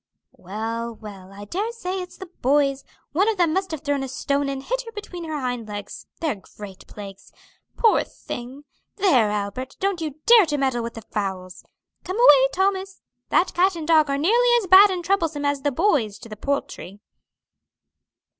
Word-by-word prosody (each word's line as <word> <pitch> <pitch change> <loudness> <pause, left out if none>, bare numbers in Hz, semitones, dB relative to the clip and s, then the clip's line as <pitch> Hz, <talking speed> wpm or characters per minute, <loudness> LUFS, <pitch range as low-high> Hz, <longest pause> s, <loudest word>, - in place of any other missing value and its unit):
"Well, 225 +4 -5
well, 195 -3 -11
I 200 +1 -10
dare 405 - -3
say 380 -5 -4
it's 360 - -10
the 380 - -8 0.2
boys; 275 +1 +2 0.3
one 385 +8 +2
of 440 - -1
them 340 -3 +2
must 380 +1 -1
have 315 -3 -5
thrown 285 -1 -1
a 270 - -3
stone 280 +2 -1
and 270 -1 -4
hit - - -2
her 465 -2 -10
between 380 -5 -7
her 310 -2 -4
hind 245 -4 -3
legs; 205 -1 -8
they're 295 -12 -2 0.2
great 200 -3 -10
plagues. 200 -2 -11 0.5
Poor 450 -2 +4
thing! 255 +4 -9 0.3
There, 275 - +3
Albert, 210 +6 -4
don't 390 -3 -1
you 305 -4 -4
dare 455 -6 +7
to 295 -1 -1
meddle 265 -3 0
with 230 0 -6
the 225 - -8
fowls! 190 -3 -5 0.4
Come 370 +3 -4
away, 280 - +7
Thomas. 385 0 -1 0.3
That 360 - +2
cat 370 +2 +2
and 320 -2 -6
dog 310 -3 +4
are 275 - 0
nearly 465 +11 +3
as 460 - -1
bad 380 +3 +8
and 360 -2 -3
troublesome 330 -6 0
to 285 0 +1
the 290 - +1
boys 280 - +1
as - - -22
the 215 - -8
poultry." 210 -5 -4
285 Hz, 185 wpm, -23 LUFS, 230-375 Hz, 0.5 s, bad